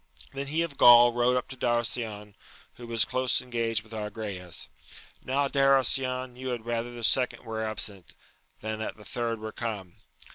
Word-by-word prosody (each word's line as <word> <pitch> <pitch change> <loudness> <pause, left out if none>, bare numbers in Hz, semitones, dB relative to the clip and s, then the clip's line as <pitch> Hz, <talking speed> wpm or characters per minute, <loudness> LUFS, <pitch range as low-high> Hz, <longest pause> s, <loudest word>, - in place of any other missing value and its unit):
Then 140 +1 -4
he 160 +4 0
of 150 -5 -7
Gaul 120 0 +8
rode 120 +1 +2
up 125 - -2
to 130 - -6
Darasion, 115 -4 -1 0.4
who 120 0 -11
was 115 -1 +3
close 130 0 +1
engaged 115 -3 -2
with 110 +1 -15
Agrayes: 105 -5 -5 0.3
— - - -20
^Now 140 +2 0
Darasion, 130 -2 +2
you 130 +1 -7
had 120 -3 -4
rather 120 0 -2
the 120 -1 -8
second 125 +2 +2
were 110 0 -3
absent, 105 -4 -3 0.5
than 110 0 -4
that 110 - -5
the 105 - -14
thu 115 +2 -2
d - - -14
were 110 0 -5
come! 105 -7 -6
120 Hz, 180 wpm, -28 LUFS, 110-125 Hz, 0.5 s, Gaul